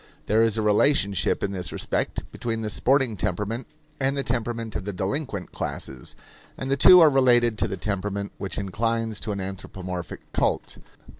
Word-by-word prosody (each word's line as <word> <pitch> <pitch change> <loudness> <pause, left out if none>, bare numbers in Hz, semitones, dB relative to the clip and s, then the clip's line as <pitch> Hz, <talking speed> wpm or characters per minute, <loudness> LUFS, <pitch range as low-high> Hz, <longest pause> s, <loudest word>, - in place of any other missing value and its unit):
There 110 +2 +3
is 115 -1 +2
a 110 - 0
relationship 105 -3 +2
in 100 - 0
this 90 -3 -3
respect - - -2
between 115 -1 -3
the 105 - -3
sporting 130 -1 +2
temperament 105 +6 -3 0.3
and 135 +1 0
the 140 - 0
temperament 115 -2 -2
of - - -2
the 105 - -3
delinquent 100 - -3
classes; 65 -2 -5 0.4
and 130 +1 -4
the - - +4
two 180 +6 +8
are 160 - +8
related 120 -4 +4
to - - +2
the 95 -2 -4
temperament 100 -1 -3
which 95 -3 -4
inclines 115 +2 -1
to 110 - -3
an 100 - -3
anthropomorphic 95 -2 -6
cult. - - -1
110 Hz, 170 wpm, -25 LUFS, 100-120 Hz, 0.4 s, two